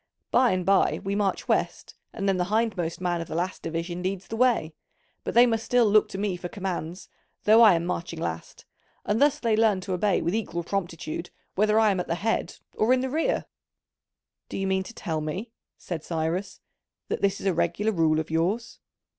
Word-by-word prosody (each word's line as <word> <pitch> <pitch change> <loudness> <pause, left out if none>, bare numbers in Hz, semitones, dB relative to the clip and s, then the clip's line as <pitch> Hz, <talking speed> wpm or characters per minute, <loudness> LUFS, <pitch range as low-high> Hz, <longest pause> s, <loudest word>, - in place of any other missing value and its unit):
By 250 0 +5
and 185 -3 0
by 195 +1 +3
we 195 - -2
march 200 -1 -1
west, - - -1 0.2
and 200 -2 -3
then 195 -1 +2
the 180 - +1
hindmost 205 -5 -1
man 175 -2 0
of 165 - -6
the - - -5
last 180 +2 -2
division 165 +2 -4
leads 190 +1 -3
the 225 - -5
way, 230 -10 +2 0.5
but - - -4
they 240 +1 +8
must 225 -2 0
still 245 0 +3
look 215 0 +4
to - - -6
me 200 -2 -1
for 175 0 -6
commands, 185 -3 -5 0.4
though 220 +2 +6
I 215 -6 +8
am 165 0 -1
marching 170 -2 -4
last: 80 - -5 0.4
and 210 +4 0
thus 290 0 +4
they 230 -6 +1
learn 215 -3 +3
to 185 0 -4
obey 190 +1 +2
with 170 - 0
equal 180 -6 -2
promptitude 170 -2 -4 0.2
whether 215 +2 +3
I 220 -2 +4
am 190 - -1
at 180 - -3
the 170 - 0
head 225 +5 -1 0.2
or 225 +4 +3
in 255 - +2
the 260 0 -2
rear." 320 +3 0 1.0
"Do - - -5
you 195 - -1
mean 190 0 +1
to 230 - -9
tell 160 -5 -3
me," 185 +10 -4 0.3
said 165 -4 -6
Cyrus, 170 +4 -3 0.5
"that - - -2
this 200 0 +1
is - - -8
a 190 - +3
regular 185 +7 0
rule 160 -5 +2
of 160 0 -4
yours?" 185 +9 -1
190 Hz, 210 wpm, -26 LUFS, 170-220 Hz, 1.0 s, they